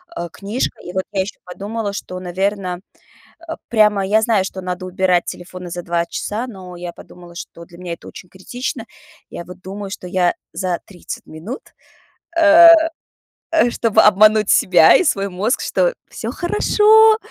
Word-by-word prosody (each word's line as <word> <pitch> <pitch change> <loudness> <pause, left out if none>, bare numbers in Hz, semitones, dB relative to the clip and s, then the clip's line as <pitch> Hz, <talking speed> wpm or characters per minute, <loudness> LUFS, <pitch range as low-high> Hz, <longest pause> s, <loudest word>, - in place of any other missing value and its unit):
а, 175 - -5
книжка. 205 +8 -4
И 180 - -8
вот 190 0 -1
я 195 -2 0
ещё 195 +2 -6
подумала, 205 +3 -5
что, 185 -2 -6
наверно, 185 0 -3 0.7
э, 325 - -3
прямо 210 -3 +3
я 215 +3 +2
знаю, 220 -4 +2
что 190 0 -6
надо 180 0 -5
убирать 185 -1 +1
телефоны 180 0 -8
за 175 +1 -5
2 170 0 -1
часа, 220 +7 -4
но 185 -5 -10
я 175 0 -7
подумала, 175 0 -14
что 170 -1 -9
для 170 +1 -17
меня 180 -1 -6
это 170 - -9
очень 180 - -12
критично. 230 +6 -6 0.4
Я 170 - -7
вот 180 +1 -12
думаю, 195 +1 -7
что 190 - -7
я 180 -1 +1 0.2
за 180 -2 -2
30 185 -3 -9
минут, 170 +12 -8 0.8
э, 330 +1 +8 0.8
э, 320 -7 +3
чтобы 230 -3 +2
обмануть 210 +1 +5
себя 175 -3 +6
и - - +4
свой 200 - 0
мозг, 200 +7 -1
что: - - +1 0.2
всё - - -5
хорошо, 435 +4 +4
190 Hz, 165 wpm, -19 LUFS, 180-220 Hz, 0.8 s, э